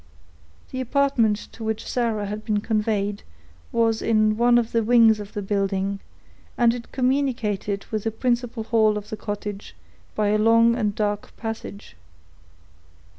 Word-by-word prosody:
The 260 - -3
apartment 255 -5 +2
to 225 - -10
which 220 -1 -3
Sarah 230 -4 -1
had 210 +2 -5
been 215 -2 0
conveyed 210 -2 -1 0.5
was 225 -1 +1
in 215 -1 +2
one 240 +2 +4
of 235 -1 0
the 230 - +2
wings 225 -1 +5
of 205 0 -8
the 205 -2 -4
building, 195 0 -1 0.6
and 235 -1 +4
it 240 -1 -8
communicated 250 -7 -1
with 215 -1 -2
the - - +2
principal 240 0 -1
hall 220 -1 +2
of 210 0 -7
the 215 - -4
cottage 205 -1 -6 0.4
by 210 -1 +1
a 215 +1 +2
long 230 +1 +5
and 210 -4 -1
dark 205 -1 -3
passage. 225 -2 -7
220 Hz, 150 wpm, -23 LUFS, 210-235 Hz, 0.6 s, wings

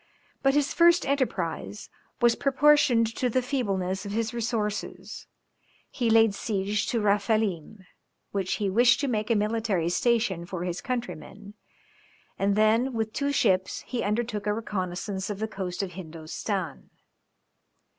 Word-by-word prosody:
But 270 0 +3
his 290 -1 +1
first 345 +1 +5
enterprise 210 - -2 0.3
was 240 -1 +5
proportioned 275 -4 +4
to 250 - +1
the 255 +2 +1
feebleness 195 -8 -1
of 200 - -6
his 230 +2 -1
resources; 225 -3 -3 0.6
he 240 -4 0
laid 225 -2 +5
siege 200 0 -1
to 235 - 0
Raphelim, 205 -2 0 0.5
which 195 -2 -1
he 205 - -1
wished 240 +7 +4
to 285 - 0
make 215 -3 -1
a 230 - +3
military 210 -5 0
station 215 -3 +1
for 175 -1 -4
his 180 0 -3
countrymen, 215 -5 -5 0.9
and 195 0 +2
then 225 +5 +3
with 220 -1 -2
two 280 0 0
ships 190 -8 +1
he 245 - -4
undertook 210 -1 -2
a 210 - +2
reconnaissance 190 -2 -4
of 205 - -3
the 220 +2 -2
coast 190 -3 -4
of 190 - -5
Hindostan. 165 0 -5
215 Hz, 140 wpm, -27 LUFS, 195-240 Hz, 0.9 s, first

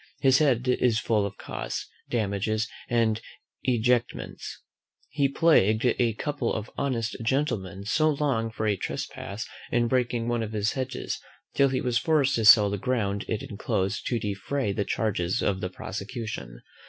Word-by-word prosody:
His 130 -1 +5
head 130 -5 +2
is 125 -2 +3
full 105 -4 +1
of 100 - -10
costs, - - -5 0.2
damages, 110 0 0 0.2
and 115 -2 +2 0.4
ejectments: 120 -1 -1 0.5
He 140 -1 +2
plagued 125 -8 +4
a 120 -2 +2
couple 140 +1 -2
of 110 0 -4
honest 120 -5 -1
gentlemen 110 - -1
so 155 +8 +3
long 140 -6 0
for 110 0 -4
a 105 -1 +2
trespass 100 +3 -5 0.3
in 120 0 +2
breaking 120 -2 0
one 120 -1 0
of 110 -1 -4
his 105 0 +1
hedges, 130 0 -3 0.3
till 140 -1 +4
he 130 - -1
was 120 -2 +1
forced 145 -2 +2
to 110 - 0
sell 105 -1 +8
the 100 - -2
ground 100 -4 -1
it 110 - -2
enclosed 95 -2 -2
to 120 - +1
defray 105 +4 -2
the 100 +1 -1
charges 95 -5 0
of 95 -2 0
the 90 - -2
prosecution. 100 - -6
115 Hz, 155 wpm, -27 LUFS, 105-130 Hz, 0.5 s, sell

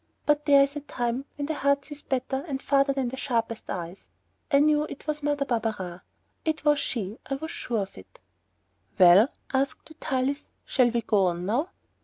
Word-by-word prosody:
But 295 0 +2
there 280 -1 +7
is 280 +2 -2
a - - -2
time 245 -1 -2
when 285 - -3
the 315 - -2
heart 280 -1 +1
sees 295 -1 -8
better 265 +1 -2
and 270 -3 -3
farther 275 0 +2
than 270 -3 -1
the 260 - -7
sharpest 230 -4 -2
eyes. 175 +1 -6 0.4
I 280 - +6
knew 300 +1 +4
it 280 - -9
was 300 -1 -2
Mother 290 -1 0
Barberin. 215 -8 -2 0.4
It 315 -1 -2
was 295 -1 +4
she. 220 -6 -3
I 275 - -1
was 315 +4 -6
sure 225 -4 -2
of 190 - -11
it. 95 - -17 0.8
"Well," 185 +5 +8 0.3
asked 270 +1 -1
Vitalis, 280 -2 -2 0.2
"shall 250 -3 +3
we 235 0 -1
go 200 -3 +3
on 175 0 -2
now?" 255 - 0
270 Hz, 190 wpm, -27 LUFS, 225-290 Hz, 0.8 s, Well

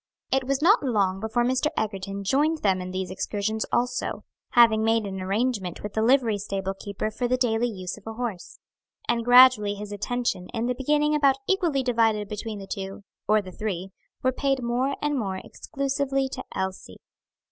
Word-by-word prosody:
It 265 0 +2
was 275 +2 0
not 405 +7 +6
long 200 -8 +1
before 220 +3 0
Mr. 260 +4 +1
Egerton 200 -2 -3
joined 295 +9 +1
them 190 -3 +2
in 180 - -5
these 185 0 -4
excursions 210 +3 -2
also, 245 +1 -1 0.3
having 225 -2 +6
made 225 -1 +2
an 190 -1 -5
arrangement 200 -2 -1
with 210 -1 -6
a 220 - +1
livery 230 -3 +3
stable 195 -1 -3
keeper 200 +2 -4
for 245 +3 -2
the 255 +1 +1
daily 240 -1 +1
use 190 -3 -6
of 210 - -18
a 225 - -4
horse. 225 -6 -5 0.5
And 235 -1 +1
gradually 245 -4 +7
his 205 0 -7
attention, 210 -2 -2
in 230 +1 -1
the 250 - +1
beginning 295 +4 +1
about 280 -3 +4
equally 340 -9 +1
divided 225 -4 +2
between 210 +1 -5
the 195 - -8
two, 195 +1 -6 0.2
or 215 0 +3
the 185 - -9
three, 190 -1 -4 0.3
were 260 - +3
paid 270 -1 0
more 250 +4 0
and 295 -2 +1
more 195 -4 -2
exclusively 275 +4 -2
to - - -6
Elsie. 190 0 -4
225 Hz, 180 wpm, -25 LUFS, 200-260 Hz, 0.5 s, gradually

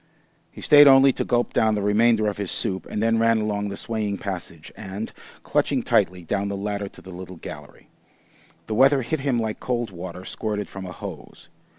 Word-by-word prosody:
He - - -12
stayed 145 -1 +8
only 135 0 +7
to - - -2
gulp 120 -1 0
down 110 -1 +3
the 105 - -2
remainder 110 +1 +3
of 105 - -2
his 100 -3 -3
soup, 95 -1 -2
and 105 - -3
then 115 0 +2
ran 115 0 +3
along 105 -1 -1
the 100 - -6
swaying 105 -3 -3
passage 90 -5 -7
and, 100 +1 -6 0.3
clutching - - 0
tightly, 90 -1 +1
down 100 +5 -1
the 100 0 -3
ladder 100 0 -3
to - - -14
the 95 - -10
little 90 +1 -9
gallery. - - -11 0.8
The 110 - -4
weather 135 +3 +4
hit 155 +6 -2
him 135 -3 0
like 110 -2 -2
cold 120 -3 -2
water 90 0 -8
squirted 105 -2 -3
from 95 -1 -8
a - - -7
hose. - - -10
105 Hz, 200 wpm, -24 LUFS, 95-115 Hz, 0.8 s, stayed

